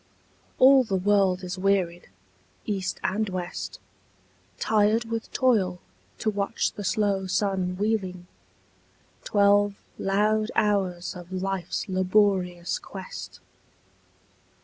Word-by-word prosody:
All 265 0 +7
the 205 -5 -2
world 190 -1 +2
is 180 +1 -5
wearied, 185 - 0 0.6
east 195 -3 -2
and 210 +2 0
west, 135 - -5 0.8
Tired 220 - +2
with 225 0 -4
toil 200 -9 +2 0.4
to 215 - 0
watch 200 -1 -1
the 205 - -7
slow 200 -2 0
sun 185 -2 0
wheeling, 190 -4 -1 1.0
Twelve 205 0 +3 0.2
loud 215 +2 +1
hours 190 -3 0
of 175 0 -10
life's 190 +1 -3
laborious 185 -2 +1
quest. - - -9
195 Hz, 100 wpm, -26 LUFS, 185-210 Hz, 1.0 s, All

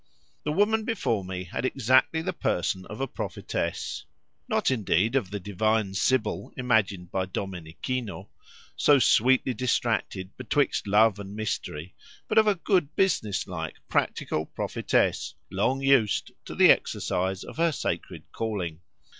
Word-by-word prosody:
The 150 - 0
woman 215 +6 +2
before 160 - -1
me 90 0 -5
had 90 - -5
exactly 130 +5 +2
the - - -2
person 95 +1 -1
of 105 - -8
a 135 - -1
prophetess—not, 75 - -3
indeed, 110 -1 +1
of 125 -9 +1
the 105 +1 -4
divine 105 +1 0
sibyl 110 +2 0
imagined 105 -8 +1
by 95 -1 -1
Domenichino, 95 +3 -5 0.5
so 145 - +5
sweetly 130 +1 +4
distracted 115 -5 -1
betwixt 130 -1 0
love 105 0 +4
and 100 0 -8
mystery, 90 -6 -4 0.3
but 220 - +4
of 215 - +4
a 210 - +4
good 175 -4 0
business 130 - +1
like, 80 -4 -5
practical 80 +1 -1
prophetess, - - 0 0.2
long 125 +8 0
used 135 -6 +3
to - - -7
the - - +8
exercise 95 +1 0
of - - -10
her 165 0 +3
sacred 140 - -4
calling. 90 -8 -3
110 Hz, 135 wpm, -27 LUFS, 95-130 Hz, 0.5 s, the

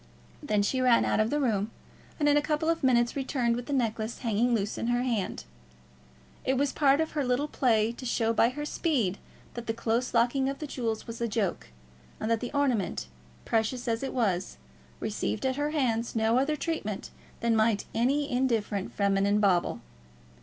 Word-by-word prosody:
Then 210 -1 +1
she 255 +6 0
ran 250 -2 +4
out - - +1
of 215 +1 +2
the 295 - 0
room, 215 -6 +1 0.5
and 295 - +2
in 290 - +5
a 295 - +4
couple 305 +2 0
of 330 0 +1
minutes 240 -2 +3
returned 260 -4 0
with 245 0 -5
the - - -4
necklace 225 -3 -1
hanging 235 +1 +1
loose 205 -1 -1
in 230 - -2
her 245 +1 +1
hand. 230 -7 -2 1.0
It 265 0 +1
was 280 +1 +1
part 280 -1 +4
of 320 - 0
her 295 -2 -1
little 250 +3 0
play 230 -6 +2
to 240 - -10
show 230 -1 +1
by 230 - +4
her 295 +4 -5
speed 255 - 0 0.3
that 240 -1 -7
the 225 - -1
close 230 +2 0
locking 245 +3 +2
of 275 - -4
the 305 - -5
jewels 230 -6 -3
was 230 0 -7
a 235 - +1
joke, 210 -4 -2 0.5
and 220 - -2
that 230 - +2
the 245 - -5
ornament, 245 - 0 0.4
precious 230 +3 0
as 225 -1 0
it 270 - -3
was, 190 -7 -1 0.4
received 105 - -2
at 260 0 0
her 290 +1 0
hands 240 -7 0
no 225 +2 +3
other 295 +3 +1
treatment 295 - -3 0.3
than 230 -1 +2
might 220 -2 +2
any 275 +5 +1
indifferent 230 -7 0
feminine 200 +1 +2
bauble. 190 -4 +2
235 Hz, 190 wpm, -28 LUFS, 220-270 Hz, 1.0 s, in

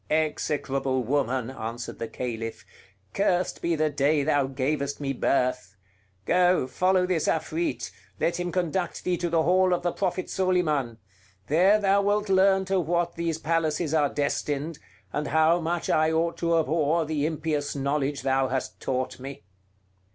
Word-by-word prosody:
"Execrable 135 -4 0
woman!" 130 -1 0
answered 115 -1 -6
the 115 - -3
Caliph; 115 -3 -5 0.5
"cursed 185 -2 0
be 170 0 +1
the 155 -1 +1
day 145 +1 +2
thou 145 -2 +2
gavest 140 +1 -2
me 140 -2 -2
birth! 125 -7 0 0.5
Go, 180 -3 +3
follow 185 +7 +2
this 180 -4 0
Afrit, 160 +1 -1 0.3
let 170 - 0
him 175 0 -2
conduct 175 0 -2
thee 180 - +1
to 175 0 -2
the 165 -1 +2
hall 185 +1 +3
of 175 - -6
the 175 - +1
Prophet 185 0 -2
Soliman; 155 -11 0 0.5
there 185 - +4
thou 200 0 +3
wilt 205 +1 0
learn 190 0 +4
to 190 0 +1
what 170 +1 0
these 165 -1 -2
palaces 160 -1 0
are 150 -3 +3
destined, 145 +2 -2 0.3
and 150 0 -2
how 160 +2 +3
much 170 +1 -2
I 155 +1 +3
ought 165 +1 0
to 170 -1 +2
abhor 160 0 +1
the 150 -1 -1
impious 155 -2 -2
knowledge 140 0 -1
thou 135 0 +2
hast 130 +1 -3
taught 130 -1 -3
me." 135 -3 -8
155 Hz, 155 wpm, -26 LUFS, 140-175 Hz, 0.5 s, there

